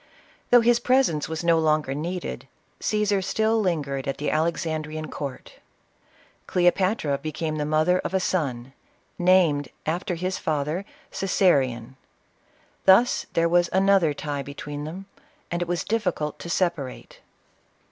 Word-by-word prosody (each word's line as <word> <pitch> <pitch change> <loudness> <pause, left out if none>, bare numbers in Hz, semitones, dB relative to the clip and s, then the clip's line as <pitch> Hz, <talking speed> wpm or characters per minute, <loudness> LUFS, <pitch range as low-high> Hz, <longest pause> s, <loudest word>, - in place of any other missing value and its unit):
Though 245 -1 +7
his 235 +1 +4
presence 240 - +2
was 160 +1 -4
no 170 -1 +4
longer 155 -3 +1
needed, 170 +5 -5 0.3
Ca?sar 210 -2 +1
still 220 +4 +1
lingered 145 -8 -2
at 135 - -2
the 150 - -2
Alex 165 +3 0
andrean 155 -1 -4
court. 140 -3 -7 0.9
Cleopatra 175 -4 +1
became 155 +1 -3
the 150 -1 -2
mother 155 +4 +2
of 190 - -3
a - - +3
son, 135 -9 -2 0.5
named, 175 -6 +3 0.2
after 175 +3 -2
his 185 +2 -3
father, 155 +5 -2 0.3
Coesarion. 135 - +1 0.9
Thus 195 +6 +5
was 170 +1 +3
there - - +1
an 195 +1 +3
other 170 -7 +3
tie 145 -1 -4
between 145 +1 -7
them, 180 +5 -7 0.5
and 175 0 -2
it 175 - -1
was 175 -1 -1
difficult 180 -9 -2
to 170 - -7
separate. 170 -7 -2
165 Hz, 135 wpm, -25 LUFS, 150-185 Hz, 0.9 s, Though